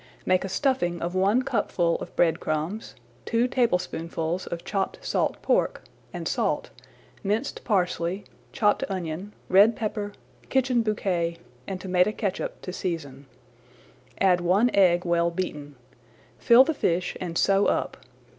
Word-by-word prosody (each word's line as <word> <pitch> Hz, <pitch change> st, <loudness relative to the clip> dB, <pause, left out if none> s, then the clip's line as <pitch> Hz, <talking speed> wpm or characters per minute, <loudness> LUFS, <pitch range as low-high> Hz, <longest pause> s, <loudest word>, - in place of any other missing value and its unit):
Make 185 Hz, 0 st, +2 dB
a 195 Hz, -, -4 dB
stuffing 190 Hz, -6 st, 0 dB
of 170 Hz, +2 st, -3 dB
one 200 Hz, +7 st, +3 dB
cupful 170 Hz, -8 st, 0 dB
of -, -, -9 dB
bread 165 Hz, -2 st, +3 dB
crumbs, 160 Hz, +8 st, -3 dB, 0.3 s
two 235 Hz, +1 st, +1 dB
tablespoonfuls 180 Hz, -7 st, -1 dB
of 170 Hz, 0 st, -5 dB
chopped 195 Hz, -2 st, -2 dB
salt -, -, 0 dB
pork, -, -, +1 dB, 0.3 s
and -, -, -5 dB
salt, -, -, -1 dB
[Page -, -, -26 dB
70] -, -, -9 dB
minced 220 Hz, +7 st, -1 dB
parsley, 180 Hz, -1 st, 0 dB, 0.3 s
chopped 210 Hz, -2 st, +2 dB
onion, 185 Hz, +1 st, -4 dB, 0.2 s
red 205 Hz, +4 st, +6 dB
pepper, 210 Hz, -2 st, -3 dB, 0.4 s
kitchen 255 Hz, -2 st, +2 dB
bouquet, 180 Hz, -6 st, -1 dB, 0.3 s
and 190 Hz, -1 st, -4 dB
tomato 185 Hz, +1 st, +2 dB
catsup 205 Hz, -3 st, -4 dB
to 180 Hz, -, -5 dB
season. 145 Hz, -8 st, -5 dB, 0.9 s
Add 180 Hz, -2 st, +4 dB
one 195 Hz, +8 st, +3 dB
egg 180 Hz, -2 st, +4 dB
well 170 Hz, 0 st, +2 dB
beaten. 150 Hz, -5 st, -5 dB, 0.6 s
Fill 235 Hz, +2 st, +7 dB
the 320 Hz, -, -1 dB
fish 175 Hz, -, 0 dB
and 170 Hz, -2 st, -3 dB
sew 195 Hz, 0 st, +3 dB
up. -, -, 0 dB
185 Hz, 140 wpm, -26 LUFS, 170-210 Hz, 0.9 s, Fill